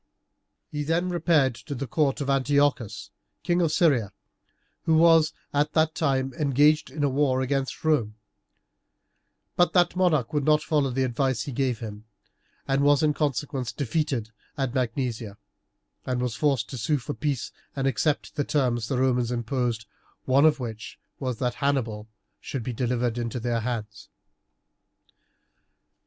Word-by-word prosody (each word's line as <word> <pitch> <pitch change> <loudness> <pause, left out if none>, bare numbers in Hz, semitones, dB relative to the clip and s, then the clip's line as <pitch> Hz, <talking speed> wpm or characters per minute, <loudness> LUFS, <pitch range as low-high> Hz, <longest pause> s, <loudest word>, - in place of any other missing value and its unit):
He 150 - -3
then 165 +4 0
repaired 160 -7 +2
to 120 +6 -7
the 140 - -3
court 140 +2 0
of 140 - -2
Antiochus, 135 -6 +1 0.3
King 175 0 +1
of 165 -3 +2
Syria, 135 - +2 0.7
who 160 -1 +4
was 165 -1 +5 0.2
at 145 +1 +1
that 155 0 +2
time 135 -5 0
engaged 150 +1 +3
in 145 +3 -4
a - - +4
war 135 -1 +1
against 135 +2 -2
Rome; 120 -9 +1 1.4
but 175 - +3
that 175 -1 +3
monarch 160 -10 +2
would 145 -1 +1
not 150 +1 +3
follow 150 -4 +1
the 130 +1 0
advice 130 -2 0
he 140 - -6
gave 125 -3 -1
him, 105 -1 -7 0.6
and 135 0 +2
was 145 +1 +4
in 150 -1 +3
consequence 140 -3 -2
defeated 135 -5 -2 0.3
at 135 -3 -1
Magnesia, 120 -4 -2 0.7
and 125 -1 -2
was 125 -2 -1
forced 135 -4 +1
to 130 - -5
sue 145 +7 +1
for 140 +3 -5
peace 145 -5 -2 0.2
and 135 -1 -1
to - - +4
accept 140 +6 -1
the 145 - 0
terms 125 -6 0
the 130 - -1
Romans 125 -2 +2
imposed, 120 -1 -2 0.4
one 135 +3 +4
of 150 -2 +4
which 110 -4 -6 0.2
was 130 -4 -3
that 125 -2 -1
Hannibal 120 -7 -1 0.3
should 130 -4 -5
be 125 - -4
delivered 120 0 -1
into 120 +1 -3
their 120 0 -1
hands. 110 -4 -5
135 Hz, 155 wpm, -26 LUFS, 120-150 Hz, 1.4 s, was